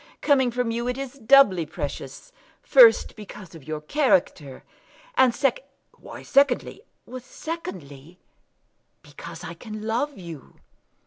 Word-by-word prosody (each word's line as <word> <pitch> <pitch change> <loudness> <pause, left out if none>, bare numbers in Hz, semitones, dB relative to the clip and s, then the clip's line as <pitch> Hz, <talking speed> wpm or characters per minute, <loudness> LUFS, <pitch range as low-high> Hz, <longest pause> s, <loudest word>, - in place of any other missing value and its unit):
Coming 265 -4 +3
from 245 -1 -2
you 235 +1 -3
it 250 +1 -2
is 275 0 -7
doubly 220 -8 +5
precious; 160 - -7 0.3
first, - - +5
because 205 -3 -12
of 160 -5 -13
your 155 -1 -5
character; 160 - 0 0.5
and 255 -2 +4
secondly 280 - -1
" - - -47
"Why - - -11
secondly?" 275 -2 +1 0.4
"Secondly, 180 - -9 0.9
because - - -11
I - - -7
can 215 -2 -9
love 245 +6 -2
you." 170 -7 -11
235 Hz, 125 wpm, -24 LUFS, 170-275 Hz, 0.9 s, doubly